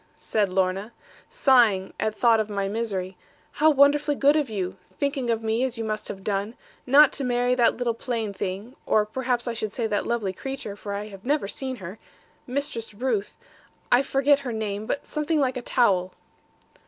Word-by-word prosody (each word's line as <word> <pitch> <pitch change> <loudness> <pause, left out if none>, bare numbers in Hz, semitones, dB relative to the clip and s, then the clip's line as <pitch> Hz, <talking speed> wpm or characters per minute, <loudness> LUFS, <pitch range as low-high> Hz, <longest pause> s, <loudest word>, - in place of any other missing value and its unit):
said 210 -3 0
Lorna, 190 +4 -1 0.4
sighing 245 - +3
at 215 0 -1
thought 230 0 +4
of 215 -1 -1
my 200 -1 -1
misery: 195 -3 -3 0.4
'how 310 +1 +4
wonderfully 290 0 +4
good 285 +2 +4
of 295 -5 +1
you, 190 -3 -3 0.2
thinking 280 -4 -1
of 225 -1 0
me 225 +2 0
as 255 -2 -2
you 225 - -3
must 215 -1 -3
have 195 -1 -7
done, 205 +3 -2 0.3
not 285 +3 +7
to 280 - -1
marry 245 0 +1
that 245 -2 +3
little 240 -1 0
plain 225 -3 -3
thing 200 +6 -5
(or 215 -1 +3
perhaps 245 +2 -2
I 240 - -1
should 215 -2 -4
say 235 - -2
that 210 -2 -1
lovely 220 -5 -1
creature, 270 -2 -6
for 205 0 -6
I 210 +1 -5
have 195 -1 -12
never 285 -4 0
seen 260 +5 -4
her), 190 -1 -9 0.5
Mistress 245 -5 -3
Ruth 220 -3 -2 0.5
I 245 - +6
forget 275 +1 +3
her 265 -3 -5
name; 215 -1 -3
but 280 - -2
something 300 +1 -1
like 260 -2 +1
a 250 - -3
towel.' 190 -8 +2
230 Hz, 190 wpm, -25 LUFS, 205-265 Hz, 0.5 s, not